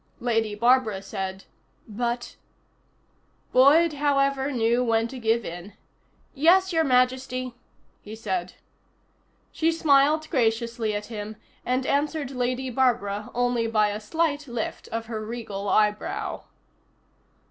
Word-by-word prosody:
Lady 225 -3 0
Barbara 235 -2 +3
said: 190 0 -5 0.4
"But 240 +2 -3 0.5
" - - -41
Boyd, 300 +6 +6
however, 275 -1 +1
knew 240 0 +1
when 225 -1 +1
to 260 - -8
give 225 0 +1
in. 175 +4 -8 0.6
"Yes, 355 +6 +4
Your 325 -1 +3
Majesty," 255 -1 +1 0.5
he 215 +1 -9
said. 190 -5 -3 1.0
She 325 +1 +1
smiled 310 -1 +3
graciously 230 -4 0
at 205 0 -4
him, 210 0 -6 0.3
and 255 +1 -1
answered 290 0 -1
Lady 255 0 -2
Barbara 215 -5 0
only 245 -1 +1
by 215 -2 +2
a 205 +1 -4
slight 290 +6 -1
lift 235 -3 -5
of 225 0 -4
her 220 -1 -5
regal 215 -3 -5
eyebrow. 210 0 0
240 Hz, 120 wpm, -25 LUFS, 215-275 Hz, 1.0 s, Boyd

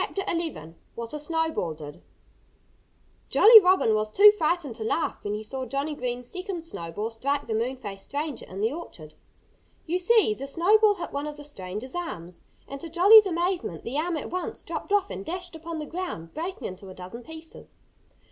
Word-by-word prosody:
XI 330 - -3 0.2
WHAT 235 +2 -6
A 300 - -4
SNOWBALL 320 - -1
DID 150 -1 -10 1.3
Jolly 445 +1 +10
Robin 365 - +3
was 215 0 0
too 415 - +8
frightened 340 - -1
to 220 - -5
laugh 275 +9 -1
when 205 0 -2
he 215 - -5
saw 260 +4 -5
Johnnie 275 +5 -2
Green's 250 -3 -4
second 365 0 -4
snowball 210 - -5
strike 280 +5 -2
the 225 - -3
moon 235 +4 -1
faced 200 -5 -7
stranger 290 -2 -4
in 190 +2 -7
the 225 +5 +1
orchard. 160 - -9 0.7
You 350 +3 0
see, 410 - +4
the 270 +5 -7
snowball 410 +8 +4
hit 350 - -7
one 285 +1 -3
of 300 0 -6
the 295 - -8
stranger's 215 -2 -6
arms. 180 - -6 0.3
And 275 0 -7
to 335 - -6
Jolly's 400 +5 +8
amazement, 345 - -2
the 265 +6 -2
arm 335 +1 -1
at 295 - -6
once 365 0 -4
dropped - - -6
off 405 -1 +2
and 195 - -5
dashed 355 - -6
upon 330 +1 -6
the 305 - -4
ground, 330 - -6
breaking 345 +4 -5
into 190 +1 -9
a 185 - -10
dozen 185 +6 -9
pieces. 320 +4 -10
295 Hz, 185 wpm, -26 LUFS, 220-350 Hz, 1.3 s, Jolly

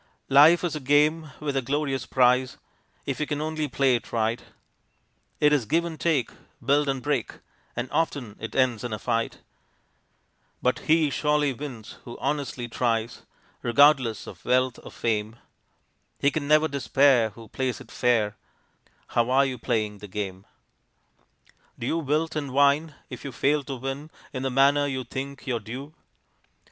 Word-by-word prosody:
Life 150 +6 +7
is 170 -3 -1
a - - -3
game 150 +3 +2
with 145 -2 -3
a 135 - +2
glorious 135 -1 -2
prize, 125 0 +3 0.5
If - - -3
we 150 - -1
can 145 -1 -2
only 155 0 -2
play 135 -1 +2
it 120 -2 -2
right. 115 0 0 1.0
It 150 0 +4
is 130 -7 +1
give 165 +3 +2
and 165 -2 -6
take, 150 -8 +1 0.3
build 140 +2 +3
and 135 -2 -2
break, 145 -4 -1 0.4
And 120 +2 -3
often 140 -9 -1
it 110 -1 -7
ends 125 -5 +2
in 120 -2 -3
a - - -2
fight; 115 0 -2 1.2
But 125 - +1
he 155 -2 +4
surely 150 -2 +1
wins 125 -5 -8
who 120 - -9
honestly 135 -4 -2
tries 115 -1 -2 0.3
(Regardless 130 -2 +4
of - - -11
wealth 130 0 +1
or - - -10
fame), 110 -1 -2 0.8
He 140 - +2
can 145 -1 -3
never 155 +1 +5
despair 135 -4 +3
who 115 +1 -13
plays 130 +1 -2
it - - -13
fair 110 -4 +1 0.7
How 120 0 +1
are 135 +2 +4
you 130 -2 -4
playing 110 -4 -1
the 105 - -9
game? 95 -1 -5 1.3
Do 120 - -5
you 165 +6 0
wilt 160 +2 -1
and 145 -3 -3
whine, 145 +2 +3 0.2
if - - -8
you 140 - -5
fail 145 +3 +1
to 135 - -4
win 135 +4 -5 0.2
In 130 - -3
the 135 - -1
manner 140 +2 +4
you 130 -2 -3
think 135 +2 -6
your 125 -3 -1
due? 130 +8 -8
135 Hz, 165 wpm, -26 LUFS, 120-150 Hz, 1.3 s, Life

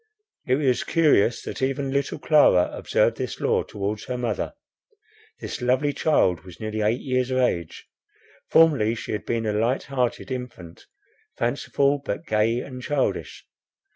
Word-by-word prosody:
It 130 - +3
was 135 -3 +1
curious 145 -9 +3
that - - -6
even 135 +1 -1
little 140 +1 -1
Clara 145 - +4
observed - - +1
this - - -4
law - - +2
towards 105 +1 -4
her 125 0 -3
mother. 120 -4 -2 0.9
This - - -6
lovely 130 +4 +1
child 95 - +2
was 90 -2 -13
nearly 110 0 -3
eight 110 +4 +1
years 130 -2 0
of 130 - 0
age. 85 -10 -1 0.6
Formerly 140 -9 +4
she - - -6
had 105 - -4
been 115 -1 -1
a 105 - 0
light 115 +5 0
hearted 130 -1 -2
infant, 120 -10 -7 0.5
fanciful, 140 0 0
but 165 - -4
gay 110 +1 +1
and 130 -2 -8
childish. 140 +1 -2
125 Hz, 150 wpm, -24 LUFS, 110-140 Hz, 0.9 s, Clara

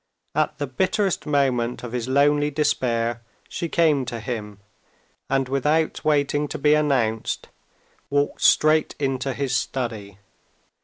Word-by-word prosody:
At - - 0
the 145 - -2
bitterest 190 - -1
moment 130 -5 0
of 120 - -6
his 120 -1 -3
lonely 145 +2 +3
despair 120 -6 0 0.3
she 170 - -4
came 155 -5 +3
to 120 -1 -5
him, 105 -4 -6 0.7
and 135 -1 +1
without 150 +4 0
waiting 145 -1 +1
to 155 - -5
be 150 +1 +3
announced, 130 -8 0 0.6
walked 145 0 0
straight 155 0 +4
into 135 -1 -1
his 130 0 -2
study. 115 -7 -3
135 Hz, 125 wpm, -23 LUFS, 120-150 Hz, 0.7 s, straight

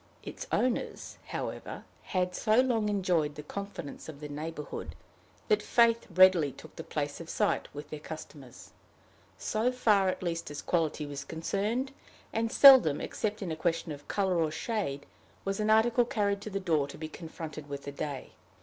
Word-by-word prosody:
Its - - -7
owners, 250 -1 -1
however, - - -5 0.2
had 180 -2 -1
so 215 +4 +3
long 235 -5 +2
enjoyed 180 -7 +1
the 150 - -7
confidence 185 -4 -7
of 145 -3 -9
the 150 - -6
neighborhood, 150 +1 -6 0.5
that 430 - +3
faith 230 -1 +3
readily 185 -6 +6
took - - -14
the - - -6
place - - -3
of - - -9
sight - - +1
with 145 +1 -9
their 155 - -5
customers 150 -5 -10 0.7
so 225 +3 0
far 210 -6 +3
at 185 - -3
least 170 -1 -2
as 145 -1 -6
quality 160 -3 0
was 140 -1 -5
concerned; 200 - -2 0.4
and 225 0 0
seldom, 260 - +8
except 210 -1 -3
in 175 - -3
a - - -1
question 165 0 -1
of 145 -1 -9
color 190 -3 +1
or 160 -1 +2
shade, 155 -4 -3 0.4
was 195 +1 -1
an 215 0 +1
article 230 +3 +5
carried 200 -3 0
to 215 - -6
the 195 -1 -2
door 160 -7 +1
to - - -10
be 155 - -5
confronted 155 -2 -8
with 140 0 -5
the 140 - -5
day. 140 -1 -5
180 Hz, 175 wpm, -30 LUFS, 150-215 Hz, 0.7 s, seldom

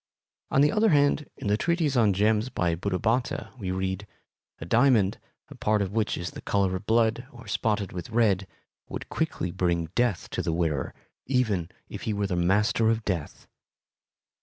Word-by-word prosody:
On 135 - +3
the 145 +1 +5
other 220 +1 +3
hand, 145 -1 +3
in - - -8
the 105 +1 +2
treatise 165 -1 +1
on 110 -4 +4
gems 105 +4 +2
by 90 -8 0
Buddhabhatta 110 +7 -1
we 95 -4 -4
read: 95 +2 -2 0.5
A - - -6
diamond, 115 -1 +3 0.3
a - - -9
part 105 0 +1
of 95 - -4
which 110 0 0
is 85 - -4
the - - -9
color 95 -2 +1
of 95 +3 -7
blood 115 +2 +2
or 120 -1 -13
spotted 105 -3 -1
with 90 +2 -6
red, 105 -5 +2 0.4
would - - -6
quickly 90 - -2
bring 85 -3 -1
death 120 -6 0
to - - -1
the 80 - -1
wearer, 80 -5 -1 0.3
even 110 -10 +1 0.2
if - - -8
he - - +1
were 100 0 -1
the 95 -2 -1
Master 105 +6 +2
of 115 -1 0
Death. 85 -7 -3
105 Hz, 180 wpm, -27 LUFS, 90-120 Hz, 0.5 s, the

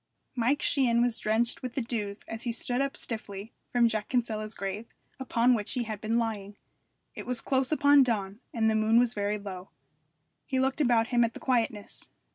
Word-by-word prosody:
Mike 255 +4 +1
Sheehan 245 -4 +3
was 240 -2 0
drenched 225 +3 0
with 250 -2 -6
the 270 - 0
dews 210 -3 -4
as 225 0 -6
he 240 - -2
stood 245 +2 -1
up 275 0 -2
stiffly 215 -2 -4 0.2
from 240 -1 +4
Jack 215 -2 -2
Kinsella's 220 -4 -1
grave, 200 +3 -4 0.3
upon 250 -1 +2
which 210 -4 -1
he 250 - -1
had 215 -2 -6
been 225 +1 0
lying. 210 -3 -3 0.6
It - - -8
was 250 -1 0
close 265 +2 0
upon 285 -2 +6
dawn, 210 -5 0
and 225 -2 +1
the 220 - +3
moon 220 +1 +3
was 245 0 +3
very 205 0 -1
low. 195 -2 -8 0.8
He 265 - 0
looked 265 +3 +1
about 235 -4 +3
him 240 -1 +3
at 230 0 -1
the - - -7
quietness. 225 -5 -2
230 Hz, 195 wpm, -29 LUFS, 215-245 Hz, 0.8 s, upon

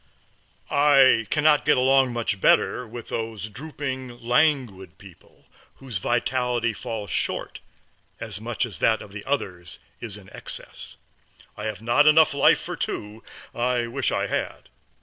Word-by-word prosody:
I 135 -5 +5
can 150 - 0
not 150 -1 +5
get 150 -1 +3
along 130 0 +4
much 115 -4 -2
better 125 - +3
with 115 +1 -9
those 110 -2 -4
drooping, 130 -1 -6
languid 120 - +1
people, 95 -3 -18 0.3
whose 125 -8 -5
vitality 120 +1 0
falls 105 -3 -6
short - - -2 0.6
as 105 -2 -6
much 120 +2 -2
as 110 -6 -8
that 110 -1 +2
of 100 - -14
the 100 0 -8
others 90 - -3 0.2
is 110 -4 -6
in 100 -2 -15
excess. - - -9 0.6
I 105 - -7
have 110 -1 -5
not 120 +6 +4
life 155 -1 +6
enough - - +6
for - - -5
two; 105 +2 -5 0.3
I 120 0 0
wish 115 - -2
I - - 0
had. - - -4
120 Hz, 150 wpm, -24 LUFS, 105-130 Hz, 0.6 s, life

